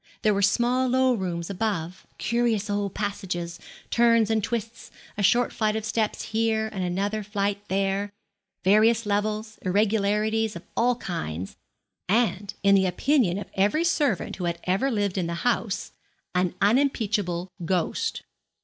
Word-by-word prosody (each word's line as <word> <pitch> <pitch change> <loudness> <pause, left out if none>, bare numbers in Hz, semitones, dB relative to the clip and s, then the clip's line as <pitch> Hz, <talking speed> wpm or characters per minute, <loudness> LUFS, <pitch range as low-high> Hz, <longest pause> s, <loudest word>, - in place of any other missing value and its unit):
There 215 - +4
were 200 - 0
small 245 +5 +2
low 260 0 +3
rooms 180 -4 -3
above, 185 -3 -3
curious 225 -2 0
old 205 -1 -2
passages, 185 -5 -3 0.3
turns 230 -2 +4
and 220 -1 +1
twists, 230 +1 -4 0.3
a 205 - -3
short 240 +5 +3
flight 215 -1 0
of 220 -1 -3
steps 220 -1 -1
here, 220 0 0
and 190 -2 -2
another 200 +4 -1
flight 200 -1 -2
there, 195 +1 0 0.5
various 215 +4 +4
levels, 215 +1 -1
irregularities 210 +2 +1
of 170 - -8
all 245 +1 +3
kinds, 95 - -5 0.5
and, 205 -2 +1
in 200 0 +5
the 190 -1 +4
opinion 195 - +2
of 205 - -7
every 205 +12 +2
servant 290 - 0
who 180 - -3
had 170 0 -1
ever 195 +9 +1
lived 205 -5 0
in 175 - -1
the 170 - -3
house, 225 -4 0 0.4
an 180 -1 +1
unimpeachable 205 -6 +1
ghost. 175 0 -1
205 Hz, 145 wpm, -25 LUFS, 190-225 Hz, 0.5 s, in